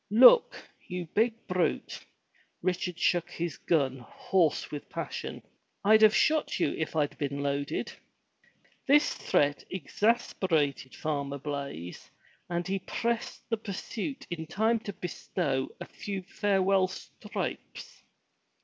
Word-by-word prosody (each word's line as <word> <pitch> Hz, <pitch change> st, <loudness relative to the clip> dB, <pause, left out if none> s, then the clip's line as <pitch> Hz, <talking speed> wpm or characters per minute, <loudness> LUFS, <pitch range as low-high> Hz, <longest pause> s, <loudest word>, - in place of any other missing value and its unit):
"Look! 255 Hz, -, +8 dB, 0.3 s
you 180 Hz, -1 st, -4 dB
big 230 Hz, +1 st, +1 dB
brute," 180 Hz, -1 st, -1 dB, 0.6 s
Richard 180 Hz, -1 st, -1 dB
shook 175 Hz, 0 st, +2 dB
his 170 Hz, -3 st, -4 dB
gun, 135 Hz, -6 st, +1 dB
hoarse 165 Hz, +6 st, 0 dB
with 145 Hz, -1 st, -6 dB
passion, -, -, -5 dB, 0.4 s
"I'd 215 Hz, +2 st, +6 dB
have 215 Hz, -1 st, +7 dB
shot 310 Hz, 0 st, +2 dB
you -, -, +2 dB
if 160 Hz, -, -3 dB
I'd 150 Hz, -2 st, +1 dB
been 140 Hz, 0 st, -2 dB
loaded." 140 Hz, 0 st, -1 dB, 1.0 s
This 290 Hz, +2 st, +5 dB
threat 145 Hz, 0 st, +1 dB
exasperated 185 Hz, -, 0 dB
Farmer 140 Hz, -2 st, -2 dB
Blaize 140 Hz, -, -6 dB, 0.4 s
and 175 Hz, 0 st, -1 dB
he 195 Hz, +1 st, 0 dB
pressed 235 Hz, +4 st, -3 dB
the 225 Hz, -, +2 dB
pursuit 220 Hz, +6 st, -5 dB
in 160 Hz, -2 st, -4 dB
time 220 Hz, +7 st, +2 dB
to 210 Hz, -3 st, -6 dB
bestow 150 Hz, -6 st, -2 dB
a -, -, -6 dB
few 195 Hz, -2 st, -5 dB
farewell 195 Hz, -1 st, +2 dB
stripes. 485 Hz, -, -6 dB
180 Hz, 120 wpm, -29 LUFS, 145-215 Hz, 1.0 s, Look